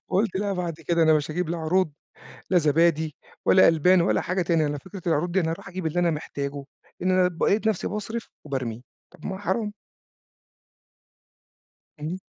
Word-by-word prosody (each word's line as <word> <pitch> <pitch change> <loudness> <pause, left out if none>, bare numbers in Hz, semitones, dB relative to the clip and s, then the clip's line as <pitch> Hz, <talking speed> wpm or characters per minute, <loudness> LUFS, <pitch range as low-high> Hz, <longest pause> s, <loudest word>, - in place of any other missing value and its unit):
فقُلت 195 0 +1
لأ، 200 +1 -1
بعد 175 -3 -2
كده 170 -1 +3
أنا 160 -1 +6
مش 150 0 0
هاجيب 175 +1 -2
لا 170 +1 -2
عروض، 160 0 +1 0.6
لا 185 - +4
زبادي 160 -1 +2 0.3
ولا 185 - +7
ألبان 170 +3 +5
ولا 170 - +2
حاجة 185 +1 -1
تانية. 165 -3 +2
أنا 145 - -2
فكرة 190 +6 -10
العروض 170 +2 +1
دي 190 - +2
أنا 160 -2 0
أروح 165 - -7
أجيب 185 -2 -5
اللي 160 +3 0
أنا 175 -1 +3
محتاجه، 140 -2 -4 0.4
إن 185 +1 +2
أنا 185 -1 +4
بقيت 200 +5 +1
نفسي 215 -4 0
باصرف 220 +3 -5 0.2
وبارمي، 125 -4 -4 0.3
طَب 170 - -14
ما 190 - -3
حرام. 210 +1 -2 2.3
إمم. 160 +5 -3
170 Hz, 175 wpm, -25 LUFS, 155-185 Hz, 2.3 s, ولا